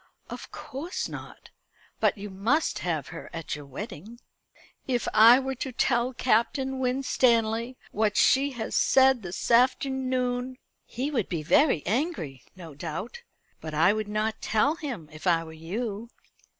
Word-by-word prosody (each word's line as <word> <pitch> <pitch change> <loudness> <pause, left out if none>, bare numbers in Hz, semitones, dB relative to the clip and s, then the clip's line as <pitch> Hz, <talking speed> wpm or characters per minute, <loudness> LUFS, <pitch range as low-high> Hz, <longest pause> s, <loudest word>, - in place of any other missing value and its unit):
"Of - - -8
course 310 +7 -5
not; - - -10 0.5
but - - +2
you 205 0 -7
must 230 +12 0
have 160 -6 -2
her 165 - -9
at 165 -2 -4
your 145 -1 -10
wedding." 210 - -8 0.7
"If 245 -3 -1
I 225 +3 +8
were 270 0 -3
to 265 +1 -5
tell 240 0 +1
Captain 260 +3 +1
Winstanley 250 -2 +1
what 210 -1 0
she 275 +2 +4
has 225 -3 -5
said 265 -2 +4
this 180 +4 -4
afternoon 255 0 +1
" - - -50
"He 265 +5 -3
would 235 -9 -1
be 165 -4 -3
very 175 - +3
angry, 225 - -2
no 170 -4 -10
doubt. 165 - -6 0.4
But 155 -1 -6
I 165 +6 +4
would 215 -1 -3
not 215 +1 -2
tell 230 +7 +2
him 265 - -6
if 155 +4 -7
I 165 -2 +3
were 160 -1 -10
you." 205 +7 -5
230 Hz, 150 wpm, -27 LUFS, 185-260 Hz, 0.7 s, I